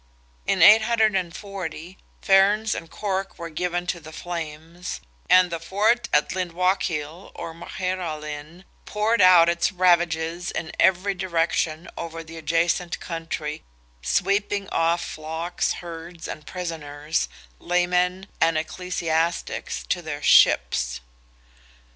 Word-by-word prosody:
In - - +3
840, 195 -5 +2 0.3
Ferns 205 +2 +4
and 165 - -6
Cork 195 0 -3
were 170 -1 -7
given 175 +2 -2
to 180 -1 -2
the 155 -1 -11
flames, 165 +1 -6 0.3
and 185 -1 +6
the 165 - -3
fort 210 +8 +1
at 150 - +2
Lyndwachill, 180 -2 -1
or 165 - -6
Magheralin, 165 -2 -5 0.2
poured 215 +1 +1
out 180 -2 +8
its 170 +3 +1
ravages 175 -1 +2
in 160 0 -4
every 190 +2 +3
direction 170 -3 -1
over 165 0 -6
the 165 0 -11
adjacent 165 +2 0
country, 165 -3 -5 0.4
sweeping 195 - 0
off 170 +1 +1
flocks, 160 +3 -3
herds, 170 0 -8
and 150 - -8
prisoners, 155 -4 -3 0.3
laymen 180 +1 +1 0.2
and 165 -1 +4
ecclesiastics, 165 0 -2
to 175 - -1
their 150 -3 -6
ships. - - +4
170 Hz, 110 wpm, -24 LUFS, 160-185 Hz, 0.4 s, out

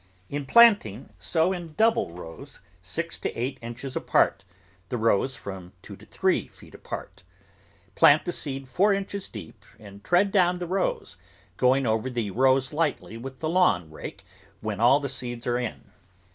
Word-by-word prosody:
In 145 -1 -4
planting, 205 - +5
sow 165 - +1
in 170 -4 -7
double 225 - +2
rows, 85 -1 -11 0.2
six - - -4
to - - -2
eight 130 +3 -3
inches 120 +3 -7
apart, 95 - +2 0.5
the 125 - -2
rows 115 +3 +1
from 95 -4 -9
two - - -10
to - - -17
three - - 0
feet - - -18
apart. - - -8 0.7
Plant 145 +9 +5
the 175 - -1
seed 135 -5 -4
four 195 +9 +3
inches 200 0 -4
deep 100 -8 -11
and 100 -1 -13
tread 190 +3 +3
down 180 -3 +3
the 175 - -4
rows, 185 - -2 0.4
going 130 +4 +3
over 110 +2 0
the 120 -5 -3
rows 130 +4 +2
lightly 150 -7 -1
with 130 +3 -9
the 155 - -1
lawn 105 - +2
rake 95 +5 -9 0.3
when 105 -1 -4
all 125 +5 +5
the 140 - -3
seeds 120 -3 -5
are 120 0 0
in. 125 -2 -6
130 Hz, 165 wpm, -26 LUFS, 110-170 Hz, 0.7 s, planting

